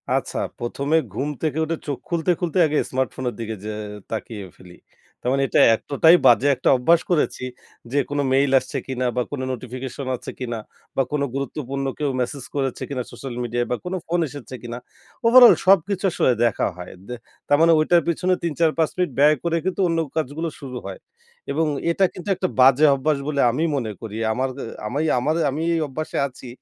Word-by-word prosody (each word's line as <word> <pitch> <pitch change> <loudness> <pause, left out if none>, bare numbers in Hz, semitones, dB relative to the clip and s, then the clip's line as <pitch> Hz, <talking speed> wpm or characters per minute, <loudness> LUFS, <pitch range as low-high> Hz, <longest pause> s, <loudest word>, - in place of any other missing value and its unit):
আচ্ছা, - - -2 0.2
১ম 130 +4 -4
এ - - +5
ঘুম 145 - -2
থেকে 155 -1 -1
উঠে 165 +1 -2
চোখ 140 -3 -2
খুলতে, 170 +1 +1
খুলতে 175 0 -1
আগে 150 - 0
স্মার্টফোনের 130 -1 -2
দিকে 110 -1 -4
যে 110 - -3 0.4
তাকিয়ে 110 -2 -5
ফেলি। 90 -1 -15 0.4
তার 125 - -1
মানে 135 0 +2
এটা - - +2 0.2
এতটাই 155 +8 +4
বাজে 120 +3 +5
একটা 130 - 0
অভ্যাস 165 +7 +4
করেছি 155 -6 +1 0.5
যে, 140 - 0
কোনো 145 0 0
মেইল 135 0 +3
আসছে 140 - -6
কিনা 130 -1 -2
বা 125 - +1
কোনো 135 -2 -3
নোটিফিকেশন 130 +2 -6
আছে - - -9
কিনা 120 -2 -3 0.4
বা 135 - +3
কোনো 145 -1 0
গুরুত্বপূর্ণ 140 0 -3
কেউ 145 -2 0
মেসেজ 125 +2 -3
করেছে 135 -3 -2
কিনা 130 -3 -2
সোশ্যাল 135 -3 -7
মিডিয়ায় 120 0 -1
বা - - +2
কোনো 185 +1 -2
ফোন 175 +2 0
এসেছে 130 -3 -9
কিনা? 120 0 -6 0.5
ওভারঅল 240 +1 +9
সবকিছু 195 +1 +3
আসলে 130 - +2
দেখা 115 - +1
হয়। 90 0 -8 0.2
দে 125 - -5 0.3
তার 145 - +4
মানে 165 0 +6
ঐটার 170 +2 +4
পিছনে 180 +2 +1
৩-৪-৫ 160 -1 +1
মিনিট 180 -5 0
ব্যয় 150 +2 +6
করে 170 -1 +1
কিন্তু 190 +1 -1
অন্য 165 -1 0 0.2
কাজগুলো 160 +2 -2
শুরু 130 -3 -7
হয়। - - -7 0.5
এবং 160 - +1 0.3
এটা 190 +3 +3
কিন্তু 180 +2 -8
একটা 185 +1 -1
বাজে 135 +3 +6
অভ্যাস 150 +2 0
বলে 145 -2 +1
আমি 150 +6 -1
মনে 120 -6 -2
করি, 110 -1 -6
আমার 130 +4 -1
অ্যা - - -5 0.2
আমি 140 +7 -2 0.2
আমার 150 +6 0
আমি 145 +4 -3
এই - - +1
অভ্যাসে 155 +4 -5
আছি। 130 -1 -13
140 Hz, 190 wpm, -22 LUFS, 125-160 Hz, 0.5 s, ওভারঅল